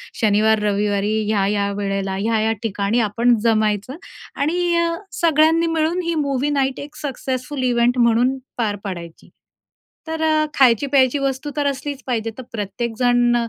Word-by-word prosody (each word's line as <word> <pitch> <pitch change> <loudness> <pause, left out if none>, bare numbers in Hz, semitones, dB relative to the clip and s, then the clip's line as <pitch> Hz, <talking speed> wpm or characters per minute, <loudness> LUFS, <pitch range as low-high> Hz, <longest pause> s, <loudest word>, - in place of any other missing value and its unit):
शनिवार 215 0 +3
रविवारी 205 0 0 0.2
ह्या-ह्या 200 -1 +1
वेळेला, 195 -1 -2
ह्या-ह्या 220 +2 0
ठिकाणी 205 +1 0
आपण 235 +3 +3
जमायचं. 215 +2 +1 0.4
आणि 345 +4 0
अ, 340 0 +2 0.3
सगळ्यांनी 325 +1 +4
मिळून 325 +2 0
ही 335 0 -1
मूवी 280 -2 0
नाईट 270 -2 0
एक 295 +1 -9
सक्सेसफुल 265 -1 -4
इव्हेंट 245 0 +2
म्हणून 240 +3 +3 0.2
पार 215 -3 0
पाडायची. 170 -4 -8 0.8
तर 320 0 -4
अ, 310 -1 +3
खायची, 250 0 +5
प्यायची 270 0 +3
वस्तू 275 +1 -2
तर 290 - 0
असलीच 280 0 -4
पाहिजे, 225 -2 -1
तर 260 - -7
प्रत्येकजण 240 +3 0
245 Hz, 140 wpm, -20 LUFS, 215-285 Hz, 0.8 s, खायची